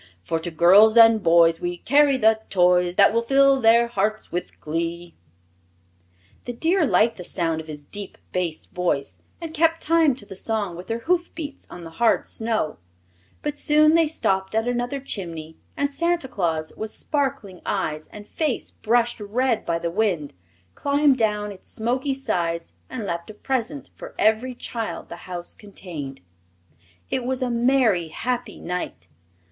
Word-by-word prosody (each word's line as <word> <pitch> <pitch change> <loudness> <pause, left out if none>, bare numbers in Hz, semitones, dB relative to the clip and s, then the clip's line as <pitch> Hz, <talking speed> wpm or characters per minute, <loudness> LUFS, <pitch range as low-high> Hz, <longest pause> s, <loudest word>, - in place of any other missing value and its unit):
For 165 - -1
to 170 +2 -2
girls 195 +7 +6
and 225 -1 +7
boys 165 -1 +4
We 175 0 -3
carry 285 +5 +3
the 220 -2 +4
toys 180 -1 +3
That - - +5
will 230 - +2
fill 275 +2 +4
their 230 +1 +5
hearts 215 -1 -2
with 175 - -5
glee!" 170 +2 -4 1.3
The 245 - -4
deer 325 +6 +2
liked 230 -1 +3
the 180 - -7
sound 165 -2 -1
of 160 - -14
his 150 -2 -9
deep 205 +4 -6
bass 175 -4 -2
voice 170 -6 -2 0.2
and 330 -2 -7
kept 330 +1 +2
time 320 -4 +3
to 225 - -7
the 195 -2 -10
song 205 -3 -2
with 180 +2 -9
their 225 - -2
hoofbeats 335 -4 -2
on 175 - -10
the 165 - -9
hard 230 - +3
snow; 220 - -2 0.6
but 295 0 -3
soon 305 +1 +4
they 330 -1 +4
stopped 190 -10 -1
at 225 +1 +1
another 245 +3 -1
chimney 165 - -5 0.2
and 285 0 0
Santa 335 -1 0
Claus, 165 -9 -2
with 220 - -5
sparkling 265 - -3
eyes 155 0 -2
and 210 0 -10
face 300 +2 -2
brushed 240 +1 +1
red 230 +3 -1
by 170 -1 +1
the 170 0 -3
wind, 180 -7 -1 0.4
climbed 285 - +2
down 210 -2 0
its 190 - -13
smoky 255 +5 -1
sides 170 -10 -2 0.2
and 250 -5 -5
left 170 -1 -4
a 215 - -9
present 265 +4 -3
for - - -11
every 220 +4 +2
child 230 -2 -5
the 170 - -8
house 175 -1 -5
contained. 165 - -9 0.9
It 255 - 0
was 260 +1 -2
a 250 - -1
merry, 235 -7 +2
happy 245 +8 -4
night. 180 +1 -5
220 Hz, 165 wpm, -23 LUFS, 175-260 Hz, 1.3 s, and